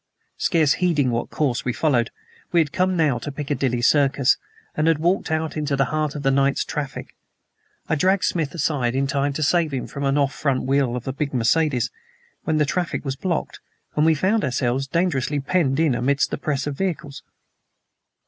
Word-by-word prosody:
Scarce 155 -5 +3
heeding 150 -8 +2
what 120 0 -2
course 135 -5 -1
we 125 - 0
followed, 125 -7 +1 0.4
we 175 - +4
had 155 -3 +1
come 185 0 +1
now 145 -7 +2
to 145 - -5
Piccadilly 135 -4 -2
Circus, 140 -1 +3 0.4
and 155 +1 +1
had 165 -2 +4
walked 175 +5 0
out 160 0 -1
into 150 -2 -1
the 135 0 +2
heart 155 -1 -1
of 145 - -5
the 135 - +3
night's 140 0 +2
traffic. 145 -3 -5 0.7
I - - 0
just 150 - 0
dragged 190 0 +3
Smith 160 -3 -1
aside 130 -6 0
in 135 +1 +1
time 140 +1 0
to 155 - -2
save 165 +1 +2
him 130 -2 -3
from 140 - -7
the - - +2
off 140 -1 +1
front 140 -4 -1
wheel 135 -2 +1
of 125 0 -6
a 130 - -2
big 140 -1 -3
Mercedes. 130 +3 +1 0.6
Then 160 -1 +2
the 150 - +3
traffic 175 +1 -2
was 135 -1 -2
blocked, 170 +3 -3 0.4
and 150 - +3
we 160 0 +4
found 195 +7 +1
ourselves 130 +1 0
dangerously 145 -3 0
penned 140 -1 +1
in 160 -5 +3
amidst 140 +4 +1
the - - -3
press 140 -3 -2
of 145 -1 -3
vehicles. 150 -5 -3
145 Hz, 195 wpm, -22 LUFS, 135-160 Hz, 0.7 s, we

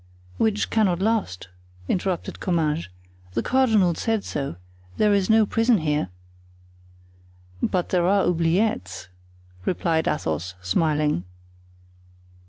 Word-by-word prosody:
"Which 215 -2 +1
cannot 195 -6 +2
last," 195 - -1 0.4
interrupted 185 -1 -2
Comminges; 165 -3 0 0.5
"the 115 - -1
cardinal 220 -9 +3
said 220 +4 -1
so; 140 - -4 0.4
there 210 -1 +3
is 200 -1 +1
no 220 0 +5
prison 225 +2 +2
here." 150 - -1 1.5
"But 180 -2 0
there 175 -1 +2
are 200 +1 +3
oubliettes!" 165 - 0 0.5
replied 165 - 0
Athos, 90 - -2
smiling. 150 - +1
175 Hz, 100 wpm, -24 LUFS, 150-210 Hz, 1.5 s, no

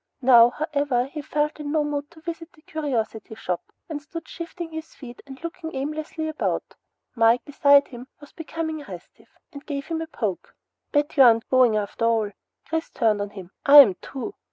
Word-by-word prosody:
Now, 240 -2 +8
however, 285 -3 -1
he 295 +3 -7
felt 300 +1 -2
in 290 -1 -4
no 310 -1 +2
mood 290 -1 -3
to 335 -2 -18
visit 330 0 -7
the 310 - -23
curiosity 230 -8 -3
shop 180 -5 -4 0.2
and 305 -3 -5
stood 330 +3 -8
shifting 340 0 -7
his 320 0 -8
feet 245 -3 -11
and 265 -1 -10
looking 335 -2 -6
aimlessly 305 +3 -4
about. 310 -1 -2 0.4
Mike, 230 -1 +3
beside 285 0 +4
him, 245 +1 -10
was 290 - -15
becoming 325 -1 -5
restive, 180 -2 -12 0.2
and 280 0 -9
gave 280 -2 -5
him 325 -1 -2
a 325 - -5
poke. 215 - -4 0.4
"Betcha 290 -1 +2
aren't 230 -3 +6
goin' 255 -4 +5
after 210 +2 -2
all!" 225 -3 +1 0.3
Chris 325 0 -3
turned 215 -4 +1
on 205 - -3
him. 190 -3 -11 0.2
"Am 280 -8 +10
too!" 275 +9 -6
285 Hz, 180 wpm, -24 LUFS, 235-315 Hz, 0.4 s, Am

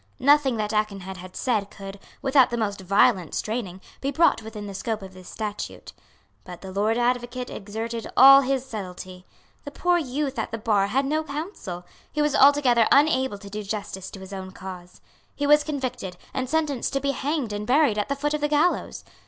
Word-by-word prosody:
Nothing 275 -2 +4
that 215 0 -2
Aikenhead 200 -3 -2
had 185 0 -11
said 215 -6 0
could, 195 0 -9 0.2
without 270 -2 +5
the 240 - -2
most 205 -3 -2
violent 195 -1 +2
straining, 215 -5 -3 0.2
be 275 - -1
brought 300 -3 +3
within 215 -1 -8
the 200 - -7
scope 210 +2 -3
of 190 -1 -10
this 185 -1 -12
statute. 210 -2 -6 0.5
But 180 -2 -10
the 190 - -8
Lord 210 +4 +1
Advocate 245 +1 -1
exerted 225 +3 -5
all 275 +1 +10
his 265 -1 -1
subtlety. 185 -5 -8 0.4
The - - -6
poor 350 +4 +1
youth 275 -2 -3
at - - -2
the 225 - -4
bar 210 -3 +1
had 270 +6 0
no 310 +3 0
counsel. 280 - -6 0.3
He 300 - -4
was 295 -1 +2
altogether 270 -5 +5
unable 265 -6 +3
to 200 0 -11
do 210 +1 -4
justice 195 -2 -5
to 195 - -10
his 190 +1 -10
own 190 -1 -6
cause. 180 -2 -10 0.3
He 290 - -2
was 295 +1 +5
convicted, 255 -11 -4 0.2
and 260 -1 -3
sentenced 300 -4 -1
to 275 - +1
be 280 +1 0
hanged 275 -5 -2
and 205 +1 -4
buried 260 -5 +3
at 210 - -2
the 280 - 0
foot 295 +2 -1
of 300 - -2
the 295 - +2
gallows. 300 +4 0
230 Hz, 195 wpm, -25 LUFS, 200-275 Hz, 0.5 s, all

